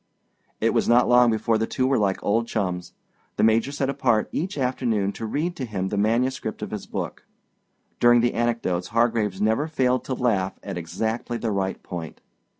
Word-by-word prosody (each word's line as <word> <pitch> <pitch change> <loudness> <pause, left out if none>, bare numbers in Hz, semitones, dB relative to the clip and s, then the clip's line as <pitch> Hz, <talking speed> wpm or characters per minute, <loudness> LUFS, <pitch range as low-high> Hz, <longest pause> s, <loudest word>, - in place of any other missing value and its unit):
It - - +2
was - - +1
not 120 +1 +5
long 125 0 +6
before 110 0 +1
the 110 - 0
two 130 - 0
were 135 -1 +2
like 100 -2 0
old 115 +3 +1
chums. 90 -6 -3 0.4
The - - 0
Major 110 +4 +3
set 140 -1 -1
apart 125 -5 +1
each 180 +1 -3
afternoon 125 -6 0
to 110 - -6
read 165 +9 -2
to 130 - -3
him 95 -4 -3
the 105 - -2
manuscript 115 +2 0
of - - -5
his 105 -2 -5
book. - - -5 0.7
During 120 0 +6
the 120 0 +1
anecdotes 115 -7 -1
Hargraves 115 -4 +1
never 110 +8 +2
failed 130 -5 +1
to 130 - -2
laugh 100 -7 0
at 100 - -5
exactly 110 +8 -3
the 115 -1 -2
right 95 -1 -2
point. 85 -3 -7
115 Hz, 185 wpm, -24 LUFS, 105-125 Hz, 0.7 s, long